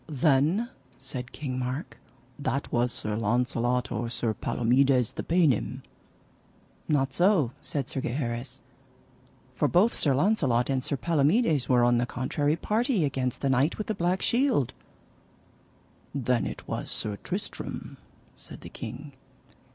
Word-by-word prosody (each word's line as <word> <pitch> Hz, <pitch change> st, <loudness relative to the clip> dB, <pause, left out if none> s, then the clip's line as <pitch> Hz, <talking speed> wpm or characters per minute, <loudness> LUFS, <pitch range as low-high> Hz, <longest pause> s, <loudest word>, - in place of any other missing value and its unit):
Then, 150 Hz, -, +2 dB, 0.3 s
said 130 Hz, -1 st, -6 dB
King 130 Hz, -4 st, -4 dB
Mark, 130 Hz, +5 st, -4 dB, 0.4 s
that 140 Hz, -1 st, -2 dB
was 120 Hz, +1 st, +2 dB
Sir 105 Hz, -2 st, -2 dB
Launcelot, 120 Hz, +2 st, 0 dB
or 115 Hz, +1 st, -2 dB
Sir 115 Hz, -1 st, -1 dB
Palomides 125 Hz, +3 st, +2 dB
the -, -, -4 dB
paynim. 165 Hz, -, +1 dB, 1.1 s
Not 135 Hz, -3 st, +2 dB
so, 175 Hz, -, +3 dB
said 140 Hz, -4 st, -3 dB
Sir 135 Hz, -, -3 dB
Gheris, 120 Hz, 0 st, -3 dB, 0.9 s
for -, -, +1 dB
both 195 Hz, +7 st, +4 dB
Sir 140 Hz, -4 st, +2 dB
Launcelot 140 Hz, -, +2 dB
and 130 Hz, -1 st, 0 dB
Sir 140 Hz, -, -2 dB
Palomides 160 Hz, -, +2 dB
were 125 Hz, -2 st, +5 dB
on 120 Hz, 0 st, +4 dB
the 120 Hz, -, 0 dB
contrary 145 Hz, +5 st, 0 dB
party 215 Hz, -, +1 dB
against 130 Hz, -3 st, -2 dB
the 140 Hz, -, +1 dB
Knight 135 Hz, +5 st, +2 dB
with 215 Hz, -, -3 dB
the 220 Hz, -, -1 dB
Black 180 Hz, 0 st, 0 dB
Shield. 240 Hz, -, +2 dB, 1.4 s
Then 125 Hz, -3 st, +1 dB
was -, -, -4 dB
it -, -, -1 dB
Sir 105 Hz, -1 st, -2 dB
Tristram, -, -, -6 dB, 0.4 s
said -, -, -11 dB
the -, -, -9 dB
king. 135 Hz, +6 st, -8 dB
135 Hz, 135 wpm, -27 LUFS, 125-160 Hz, 1.4 s, were